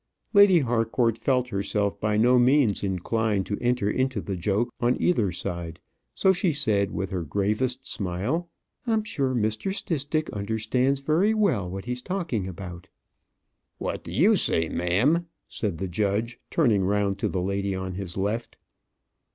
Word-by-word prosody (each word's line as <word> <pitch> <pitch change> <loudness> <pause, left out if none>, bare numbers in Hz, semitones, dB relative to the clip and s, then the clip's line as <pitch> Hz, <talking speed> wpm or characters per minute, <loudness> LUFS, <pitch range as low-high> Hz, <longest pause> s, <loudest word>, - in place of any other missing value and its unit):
Lady 200 -5 +7
Harcourt 115 -1 +1
felt 125 +1 0
herself 100 -1 -1
by 105 -1 +1
no 125 +3 +5
means 125 -5 +3
inclined 100 +2 0
to 100 - -3
enter 125 -3 +1
into 130 +4 0
the 100 - -4
joke 100 +6 -1
on 120 0 +1
either 110 - +2
side; 85 -2 -4 0.4
so 190 - +4
she 180 -1 +1
said, 110 -9 +1
with 95 +1 -4
her 95 -2 -2
gravest 105 - -1
smile, 110 - -2 0.4
"I'm 220 -2 +2
sure 140 - -1
Mr. 110 - -1
Stistick 155 -5 -1
understands 110 +6 0
very 170 +10 +2
well 160 - +1
what 95 +1 -6
he's 125 0 -4
talking 160 - -2
about." 90 0 -8 0.9
"What - - -4
do - - -8
you - - +4
say, 80 -1 +3
ma'am?" 125 - +1 0.2
said 100 -7 -3
the 95 - -3
judge, 105 +6 -1
turning 115 - +2
round 100 0 0
to - - 0
the 90 -2 -2
lady 100 0 -1
on 95 0 -4
his 90 -2 -5
left. 105 +5 -2
110 Hz, 155 wpm, -26 LUFS, 95-130 Hz, 0.9 s, Lady